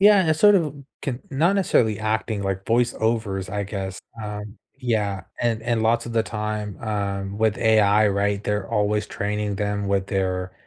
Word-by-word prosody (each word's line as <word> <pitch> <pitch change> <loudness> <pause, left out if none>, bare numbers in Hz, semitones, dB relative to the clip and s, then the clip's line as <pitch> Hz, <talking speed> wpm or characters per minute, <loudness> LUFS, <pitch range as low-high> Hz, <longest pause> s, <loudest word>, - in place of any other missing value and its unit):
Yeah, 205 0 +7
and 160 -1 +3
sort 205 +5 +6
of, 160 -7 +1 0.3
can 130 -2 -3
not 160 +8 +2
necessarily 115 - +2
acting 110 -1 -1
like 95 0 -2
voiceovers, 110 -5 0
I 100 0 -2
guess, 95 -2 -5 0.2
um, 105 0 -6 0.2
yeah, 105 -6 -1 0.2
and 115 -2 +1
and 115 -1 0
lots 115 +2 +2
of 120 - -5
the 115 -1 +2
time, 105 -2 -4
um, 100 -2 -2
with 110 -1 +2
AI, 110 -2 +4
right, 100 0 0
they're 105 -2 -2
always 105 0 +1
training 105 0 -2
them 100 0 -1
with 100 -1 +1
their 95 -2 -1
105 Hz, 170 wpm, -23 LUFS, 100-115 Hz, 0.3 s, Yeah